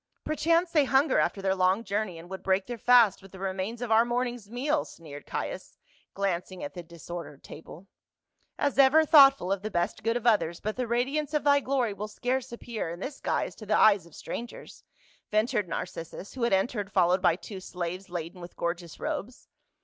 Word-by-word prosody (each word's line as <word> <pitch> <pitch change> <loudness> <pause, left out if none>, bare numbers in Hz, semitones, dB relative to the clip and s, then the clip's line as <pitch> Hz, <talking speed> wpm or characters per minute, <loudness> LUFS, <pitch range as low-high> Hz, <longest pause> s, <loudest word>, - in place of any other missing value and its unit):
"Perchance 335 +3 +1
they 300 -4 +4
hunger 270 +3 +3
after 195 - 0
their 190 -1 +2
long 190 +3 +2
journey 200 -3 -2
and 165 +1 -11
would 190 +1 -7
break 190 0 +1
their 240 -1 -6
fast 240 -5 +5
with 195 -1 -15
the 190 - -11
remains 195 +5 -3
of 235 - -4
our 220 +1 +6
morning's 240 -2 -2
meal," 290 +6 0
sneered 145 -3 -11
Caius, - - -5 0.4
glancing 185 -2 -2
at 145 - -6
the 175 - -7
dis 170 -1 -14
ordered 170 -5 -7
table. 165 +3 -11 0.7
"As 280 -1 0
ever 290 +4 +6
thoughtful 275 - +6
of 195 -1 0
the 215 - -4
best 175 +1 -1
good 230 +2 +1
of 240 - -8
others, 200 -8 +2
but 215 +1 -3
the 250 -1 -2
radiance 275 +6 -1
of 295 - +1
thy 285 0 +4
glor} 255 -6 0
will 210 +2 -5
scarce 250 +4 -2
appear 235 -6 -5
in 170 +1 -7
this 270 +8 -6
guise - - -1
to 215 - -10
the 215 - +3
eyes 200 -5 +5
of 170 - -17
strangers," 240 +1 -8 0.5
ventured 215 -1 +1
Narcis 165 -1 -5
sus, 195 - -10
who 260 - -7
had 235 -3 +2
entered 205 +1 0
followed 180 -1 +3
by 170 - +4
t\vo 195 +2 -9
slaves 180 +1 -5
laden 175 +1 -6
with 175 0 -10
gorgeous 170 -1 -4
robes. 245 +5 -5
210 Hz, 205 wpm, -28 LUFS, 180-245 Hz, 0.7 s, our